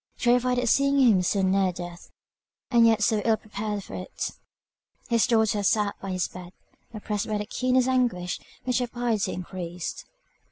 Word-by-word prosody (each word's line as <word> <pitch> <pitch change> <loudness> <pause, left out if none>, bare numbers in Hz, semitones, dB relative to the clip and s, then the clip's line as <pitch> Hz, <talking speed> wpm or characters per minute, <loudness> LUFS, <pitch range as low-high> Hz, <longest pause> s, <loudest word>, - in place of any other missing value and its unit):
Terrified 250 +1 +2
at 245 0 0
seeing 275 +3 +3
him 225 -8 +5
so 190 +2 +1
near 190 0 +2
death, 175 -1 -9 0.6
and 235 -2 +6
yet 225 -2 +3
so 215 +1 +2
ill 225 -1 +3
prepared 210 -1 -5
for - - -11
it, 185 - -5 0.8
his 230 -2 +3
daughter 220 -3 +2
sat 205 0 +2
by 195 - -5
his 185 -1 -1
bed, 180 0 -11 0.4
oppressed 210 -2 -3
by 215 -1 -1
the 210 - -3
keenest 255 +3 +1
anguish, 240 -9 0 0.2
which 250 0 0
her 245 - -1
piety 235 -4 -1
increased. 180 -1 -6
215 Hz, 165 wpm, -26 LUFS, 190-240 Hz, 0.8 s, and